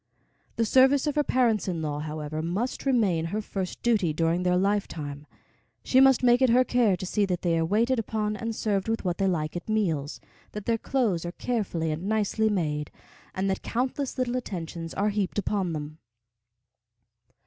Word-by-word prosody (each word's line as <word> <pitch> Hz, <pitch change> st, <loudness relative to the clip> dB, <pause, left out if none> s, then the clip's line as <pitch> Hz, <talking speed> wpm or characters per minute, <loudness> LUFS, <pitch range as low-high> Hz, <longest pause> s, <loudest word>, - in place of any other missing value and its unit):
The 230 Hz, -, +1 dB
service 265 Hz, +4 st, +4 dB
of 295 Hz, -, 0 dB
her 295 Hz, -, +2 dB
parents 235 Hz, -7 st, +1 dB
in 170 Hz, -3 st, -2 dB
law, 145 Hz, -1 st, -2 dB
however, 155 Hz, 0 st, -4 dB
must 200 Hz, -, -3 dB
remain 200 Hz, -11 st, +2 dB
her 200 Hz, +6 st, -2 dB
first 195 Hz, -3 st, -5 dB
duty 210 Hz, -9 st, +2 dB
during 165 Hz, +3 st, +1 dB
their 180 Hz, 0 st, +2 dB
lifetime. 160 Hz, -7 st, -2 dB, 0.6 s
She 260 Hz, -, +3 dB
must 265 Hz, -1 st, +5 dB
make 245 Hz, +1 st, +5 dB
it 260 Hz, -, +5 dB
her 250 Hz, +2 st, +5 dB
care 235 Hz, -7 st, +2 dB
to 185 Hz, -, -5 dB
see 205 Hz, +3 st, 0 dB
that 180 Hz, -2 st, -2 dB
they 170 Hz, -2 st, +2 dB
are 165 Hz, -, +1 dB
waited 230 Hz, +8 st, +2 dB
upon 215 Hz, -1 st, -2 dB
and 230 Hz, +1 st, -4 dB
served 200 Hz, -3 st, -1 dB
with 225 Hz, -3 st, -2 dB
what 180 Hz, +1 st, -1 dB
they 195 Hz, -, +2 dB
like 155 Hz, -4 st, -1 dB
at 175 Hz, -, -6 dB
meals, 165 Hz, -10 st, -1 dB, 0.3 s
that 210 Hz, -1 st, -6 dB
their 230 Hz, -1 st, +1 dB
clothes 220 Hz, -12 st, 0 dB
are 175 Hz, 0 st, -5 dB
carefully 185 Hz, -11 st, -2 dB
and 165 Hz, +6 st, -3 dB
nicely 220 Hz, 0 st, +1 dB
made, 150 Hz, -7 st, -1 dB, 0.5 s
and 190 Hz, +1 st, -1 dB
that 190 Hz, -, -3 dB
countless 255 Hz, +3 st, -2 dB
little 255 Hz, -1 st, 0 dB
attentions 170 Hz, -7 st, -5 dB
are 205 Hz, +2 st, +1 dB
heaped 205 Hz, -2 st, -2 dB
upon 195 Hz, -3 st, -1 dB
them. 155 Hz, 0 st, -6 dB
200 Hz, 185 wpm, -27 LUFS, 165-230 Hz, 0.6 s, must